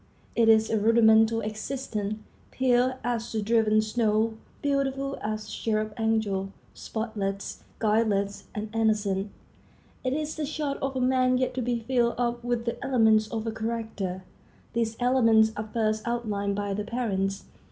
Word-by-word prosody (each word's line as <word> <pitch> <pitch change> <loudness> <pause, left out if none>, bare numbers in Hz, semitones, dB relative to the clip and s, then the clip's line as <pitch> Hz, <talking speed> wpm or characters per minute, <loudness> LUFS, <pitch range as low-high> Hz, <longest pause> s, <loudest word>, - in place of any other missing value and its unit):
It 230 -1 +4
is 220 0 +5
a 220 - +2
rudimental 225 0 +5
existence, 215 -1 -3 0.3
pure 255 0 +2
as 235 -1 -2
the 220 - -1
driven 215 0 +3
snow—beautiful 245 +5 -1
as 215 0 -3
a - - -10
cherub 215 -1 -1
angel, 215 -4 0 0.2
spotless, 205 -3 -4
guileless, 210 -2 +1
and 215 +1 -5
innocent. 210 -3 +1 0.7
It 255 0 0
is 305 +1 -2
the 310 - -1
chart 295 -2 -3
of 270 0 -2
a 260 - 0
man 255 0 +3
yet 255 0 0
to 260 - -2
be 240 -1 -1
filled 240 0 +1
up 240 0 -1
with 240 -1 -1
the 235 - -3
elements 220 -5 +4
of 220 0 -4
a 225 - -1
character. 220 -5 -4 0.5
These 230 -1 -1
elements 230 -3 +4
are 215 +1 -5
first 215 -1 0
outlined 210 -4 -1
by 205 0 -2
the 210 +1 -2
parents. 200 -4 -2
225 Hz, 150 wpm, -27 LUFS, 215-245 Hz, 0.7 s, is